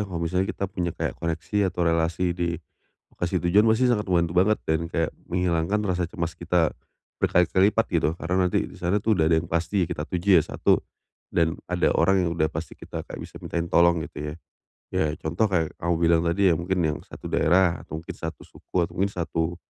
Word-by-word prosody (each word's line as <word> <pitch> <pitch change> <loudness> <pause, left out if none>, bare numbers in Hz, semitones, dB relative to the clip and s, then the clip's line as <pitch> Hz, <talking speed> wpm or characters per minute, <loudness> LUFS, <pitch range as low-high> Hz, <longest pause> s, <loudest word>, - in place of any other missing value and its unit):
kalau 90 - -5
misalnya 90 +3 0
kita - - -3
punya 90 -3 -3
kayak - - -2
koneksi, 85 +5 0
atau 90 -1 -1
relasi 85 +2 +1
di, 85 -1 -2 0.6
lokasi 90 +1 -2
tujuan, 100 +6 +4
pasti 110 +3 +3
sangat 105 -3 -1
membantu 85 -2 +2
banget, 100 +4 +3
dan 80 +1 0
kayak 80 -2 -1 0.2
menghilangkan 90 +2 0
rasa 90 -3 -1
cemas 85 -4 -3
kita, 85 -1 +1 0.5
berkali-kali 90 +3 +4
lipat 115 +1 +1
gitu. 85 -3 +2
Karena 90 +1 +1
nanti - - +1
di - - -10
sana 90 +4 +1
itu, 110 +2 +1
udah 80 -5 +3
ada 80 - +4
yang 80 +1 -2 0.4
kita - - -3
tuju 90 +2 -3
ya - - -1
satu, - - +2 0.5
dan 80 0 +1
ada 90 -1 +2
orang 95 +2 +3
yang 85 - 0
udah 80 -2 +1
pasti 80 -1 -6
kita - - -7
kayak - - -8
bisa - - -10
mintain 85 0 -2
tolong 85 0 +4
gitu 75 0 -6
ya, - - -8 0.6
ya - - +2
contoh, 85 +8 0
kayak 85 -4 0
kamu 85 0 +1
bilang 85 0 +3
tadi 90 +2 +3
ya, - - +3
mungkin 90 +3 -2
yang 75 -1 0
satu - - -11
daerah, 90 +1 +3
atau 80 - -6
mungkin 80 - -8
satu 80 -3 -6
suku, - - -11
atau 85 - -15
mungkin 100 +3 0
satu, 85 -1 -2
85 Hz, 205 wpm, -25 LUFS, 85-95 Hz, 0.6 s, tujuan